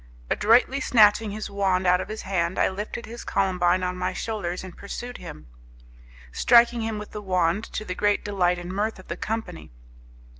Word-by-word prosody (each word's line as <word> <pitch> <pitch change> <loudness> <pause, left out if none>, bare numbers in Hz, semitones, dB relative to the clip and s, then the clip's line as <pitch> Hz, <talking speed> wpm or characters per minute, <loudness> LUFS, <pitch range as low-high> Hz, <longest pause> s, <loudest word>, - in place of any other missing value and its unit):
Adroitly 240 +5 +3
snatching 215 -3 +4
his 215 +1 -5
wand 190 -2 0
out 180 0 +4
of - - -7
his 215 0 -6
hand, 180 -2 -1
I - - +3
lifted 210 +4 -6
his 235 +1 -9
Columbine 185 -1 +1
on 180 0 -1
my 180 0 -2
shoulders, 185 -6 -4
and 185 -2 -10
pursued 245 +5 -7
him, 75 - -10 0.9
striking 235 - +4
him 220 -1 -2
with 210 0 -8
the 210 - -6
wand, 185 +1 0
to 215 - -6
the 180 - -3
great 205 +2 +1
delight 180 -3 +1
and 175 +1 -6
mirth 210 +3 -1
of 185 - -15
the - - -3
company. 215 -6 -5
200 Hz, 185 wpm, -25 LUFS, 180-220 Hz, 0.9 s, snatching